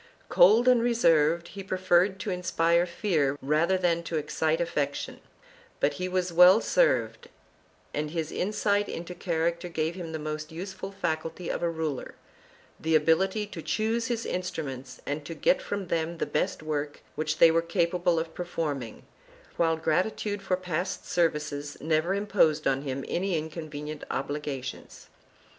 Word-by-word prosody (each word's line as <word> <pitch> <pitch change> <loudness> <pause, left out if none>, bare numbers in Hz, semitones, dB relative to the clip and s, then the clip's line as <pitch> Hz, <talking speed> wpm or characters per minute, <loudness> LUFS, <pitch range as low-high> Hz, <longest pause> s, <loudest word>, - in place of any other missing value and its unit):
Cold 220 +7 +6
and 250 -2 +6
reserved, 170 -8 +3
he 200 - -7
preferred 185 0 +2
to 195 +1 -3
inspire 175 -1 +2
fear 160 -6 0
rather 155 +7 +2
than 170 -2 +1
to 170 -1 -3
excite 155 +1 0
affection, 145 -4 -2 0.6
but - - +2
he 185 - -1
was 180 -1 -1
well 180 +4 +8
served - - +1 0.6
and 150 0 -2
his 160 0 -3
insight 205 +1 0
into 175 +1 -5
character 170 0 -1
gave 160 0 -1
him 170 -2 -6
the 160 - -3
most 155 +1 -5
useful 190 +3 -6
faculty 165 -2 -3
of - - -3
a 170 - +1
ruler, 160 -4 -4 0.6
the 160 0 +1
ability 185 +7 +3
to 190 -5 -8
choose 225 +5 0
his 230 -2 -2
instruments 140 -8 -4
and 145 +1 -3
to 165 +3 -7
get - - +2
from 205 - -3
them 165 0 -2
the - - -1
best 185 - -1
work 150 -1 -3
which 155 0 -2
they 165 0 +7
were 165 +1 +3
capable 170 0 +1
of 160 0 -2
performing, 150 -8 -4 0.5
while 165 -1 +2
gratitude 195 +6 0
for 185 -1 0
past 180 0 -3
services 150 -3 -1
never 160 +4 +1
imposed 190 -7 +2
on 135 0 +2
him 135 -1 -4
any 180 -2 0
incon 160 0 -6
venient 150 0 -6
obligations. 140 -3 -5
170 Hz, 150 wpm, -28 LUFS, 155-185 Hz, 0.6 s, well